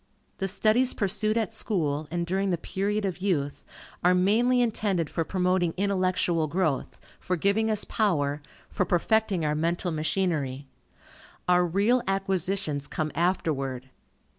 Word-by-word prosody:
The 195 - 0
studies 220 +6 +2
pursued 215 +2 0
at 220 -5 -1
school, 155 -7 -1
and 170 0 -2
during 190 +3 0
the 175 - +1
period 200 +5 -2
of 185 -2 -3
youth, 155 -8 -1 0.4
are 180 +1 +5
mainly 225 +7 +3
intended 205 -8 0
for 165 - -1
promoting 180 -1 0
intellectual 185 -4 +1
growth, 160 -4 -1 0.2
for 180 - -1
giving 200 +6 +1
us 215 -1 +2
power, 150 -9 0 0.3
for - - -1
perfecting 185 0 +1
our 150 - +1
mental 170 +3 -1
machinery. 155 -4 -1 0.8
Our 180 0 +4
real 205 +8 +2
acquisitions 195 -6 -1
come 155 -1 -3
afterward. 135 -7 -1
180 Hz, 135 wpm, -27 LUFS, 160-200 Hz, 0.8 s, are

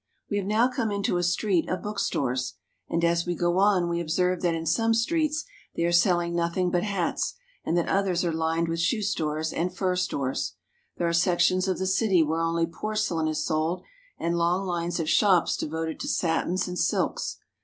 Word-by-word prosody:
We 205 - +1
have 195 -1 -2
now 220 +4 +3
come 250 -3 -2
into 200 -3 0
a 175 - 0
street 175 0 +1
of 185 -1 -2
bookstores; 135 -11 -1 0.3
and, 170 0 +1
as 170 +1 +1
we 175 - 0
go 175 +2 +1
on, 195 -3 +3
we 170 0 -1
observe 180 +2 0
that 170 -2 +1
in 165 0 -4
some 225 +7 +2
streets 305 +5 0 0.3
they 170 - 0
are 170 - +2
selling 175 -1 +3
nothing 170 +1 0
but 175 -1 +2
hats, 195 -5 -1 0.3
and 170 - 0
that 170 - +1
others 190 -2 +1
are 170 - 0
lined 165 +1 0
with 165 0 -2
shoe 215 +6 +1
stores 155 -5 -1
and 180 +2 -2
fur 185 -1 +1
stores. 140 -7 -2 0.4
There 170 - 0
are 170 - 0
sections 180 +2 +3
of 185 - 0
the 190 - -2
city 190 -2 +3
where 160 +2 -1
only 165 0 +1
porcelain 180 -2 -2
is 155 -1 -1
sold, 160 +2 -1 0.3
and 170 0 -1
long 175 +3 +1
lines 175 -1 -2
of 160 - -2
shops 185 0 +4
devoted 160 +1 -3
to - - -4
satins 175 +2 0
and 180 0 -4
silks. - - 0
175 Hz, 195 wpm, -26 LUFS, 165-190 Hz, 0.4 s, shops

